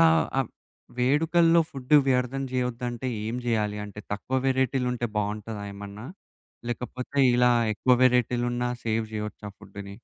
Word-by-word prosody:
అలా 165 Hz, -, +7 dB, 0.3 s
ఆ -, -, +5 dB, 0.6 s
వేడుకల్లో 165 Hz, +6 st, +4 dB
ఫుడ్డు 135 Hz, +2 st, +2 dB
వ్యర్థం 130 Hz, +1 st, +1 dB
జేయొద్దంటే, 125 Hz, 0 st, -2 dB, 0.2 s
ఏం 115 Hz, +2 st, -3 dB
జేయాలి? 105 Hz, -3 st, 0 dB
అంటే, 105 Hz, 0 st, -9 dB
తక్కువ 130 Hz, +6 st, -2 dB
వేరైటీలుంటే 125 Hz, -2 st, +1 dB
బావుంటాదా 105 Hz, 0 st, -3 dB
ఏమన్నా? 100 Hz, +3 st, -9 dB, 0.6 s
లేకపోతే, 125 Hz, +3 st, -5 dB, 0.2 s
ఇలా 125 Hz, 0 st, +5 dB, 0.2 s
ఎక్కువ 125 Hz, +4 st, +3 dB
వేరైటీలున్నా 120 Hz, 0 st, +1 dB, 0.2 s
సేవ్ 110 Hz, 0 st, 0 dB
జేయొచ్చా 105 Hz, -1 st, -5 dB
ఫుడ్డుని? 100 Hz, 0 st, -9 dB
120 Hz, 120 wpm, -26 LUFS, 105-130 Hz, 0.6 s, అలా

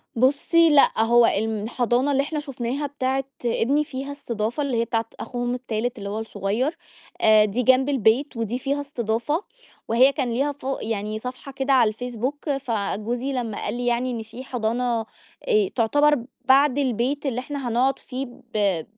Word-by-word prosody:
بُصّي 285 Hz, +7 st, +4 dB
لأ 285 Hz, -6 st, +5 dB
هو 235 Hz, +1 st, +5 dB
الم 220 Hz, 0 st, 0 dB
حضانة 245 Hz, +3 st, +1 dB
اللي 275 Hz, 0 st, +2 dB
إحنا 300 Hz, +2 st, -3 dB
شفناها 275 Hz, 0 st, -3 dB
بتاعة 270 Hz, -1 st, -1 dB, 0.2 s
ابني 265 Hz, +5 st, +2 dB
فيها 275 Hz, -1 st, -6 dB
استضافة 240 Hz, -1 st, -3 dB
اللي 265 Hz, -4 st, -1 dB
هي 230 Hz, -, +1 dB
بتاعة 225 Hz, -1 st, -1 dB
أخوهم 245 Hz, -1 st, -3 dB
التالت 245 Hz, -1 st, -3 dB
اللي 200 Hz, -2 st, -5 dB
هو 210 Hz, +2 st, -3 dB
الصغيّر، 225 Hz, -, -2 dB, 0.4 s
آآ 215 Hz, -1 st, +6 dB
دي 220 Hz, +5 st, -1 dB
جنب 260 Hz, +2 st, +4 dB
البيت 260 Hz, +1 st, +2 dB
ودي 230 Hz, +2 st, -2 dB
فيها 280 Hz, +2 st, -1 dB
استضافة، 265 Hz, -, -2 dB, 0.4 s
وهي 250 Hz, +4 st, +5 dB
كان 265 Hz, -5 st, -2 dB
ليها 275 Hz, +5 st, +1 dB
فوق 275 Hz, -1 st, -4 dB
يعني 215 Hz, -1 st, -3 dB
صفحة 255 Hz, +3 st, -7 dB
كده 270 Hz, 0 st, 0 dB
على 245 Hz, -4 st, +5 dB
الفيسبوك، 250 Hz, +6 st, -4 dB
فجوزي 240 Hz, -1 st, -2 dB
لمّا 235 Hz, -5 st, -3 dB
قال 210 Hz, -, -2 dB
لي 245 Hz, -, -3 dB
يعني 245 Hz, +1 st, +1 dB
إن 235 Hz, -2 st, -3 dB
في 230 Hz, +4 st, -10 dB
حضانة 240 Hz, -1 st, -1 dB, 0.4 s
أ 430 Hz, -5 st, +3 dB
تعتبر 290 Hz, +6 st, +3 dB, 0.3 s
بعد 270 Hz, +1 st, +5 dB
البيت 265 Hz, +2 st, 0 dB
اللي 250 Hz, -3 st, -1 dB
إحنا 270 Hz, -1 st, -4 dB
هنقعد 255 Hz, +3 st, +1 dB
فيه 265 Hz, +1 st, -5 dB, 0.3 s
ب 195 Hz, -6 st, +1 dB
250 Hz, 170 wpm, -24 LUFS, 225-275 Hz, 0.4 s, آآ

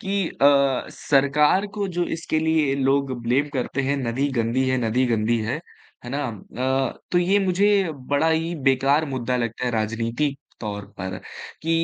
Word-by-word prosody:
कि 195 Hz, -2 st, -1 dB
अ, 140 Hz, -2 st, +3 dB
सरकार 150 Hz, +7 st, +2 dB
को 205 Hz, -1 st, 0 dB
जो 175 Hz, -, +2 dB
इसके 160 Hz, -1 st, -1 dB
लिए 155 Hz, -3 st, +2 dB
लोग 135 Hz, 0 st, +1 dB
ब्लेम 130 Hz, +5 st, +1 dB
करते 130 Hz, +1 st, -1 dB
हैं, 140 Hz, +2 st, 0 dB
नदी 130 Hz, +2 st, -1 dB
गंदी 115 Hz, +3 st, +1 dB
है, 130 Hz, -, +2 dB
नदी 125 Hz, +4 st, +2 dB
गंदी 115 Hz, 0 st, +1 dB
है, 115 Hz, +8 st, -2 dB, 0.4 s
है 120 Hz, -, -6 dB
ना? 145 Hz, +2 st, -2 dB, 0.7 s
अ, -, -, -14 dB
तो 175 Hz, -, +4 dB
ये 185 Hz, +3 st, +3 dB
मुझे 195 Hz, +3 st, +3 dB, 0.5 s
बड़ा 160 Hz, +3 st, +3 dB
ही 165 Hz, +1 st, 0 dB
बेकार 135 Hz, +3 st, +3 dB
मुद्दा 125 Hz, 0 st, -1 dB
लगता 115 Hz, 0 st, -2 dB
है 125 Hz, -, +1 dB
राजनीतिक 115 Hz, +5 st, -1 dB, 0.2 s
तौर 105 Hz, -2 st, -4 dB
पर 95 Hz, 0 st, -4 dB, 0.4 s
कि 165 Hz, -, -2 dB
135 Hz, 165 wpm, -23 LUFS, 120-155 Hz, 0.7 s, तो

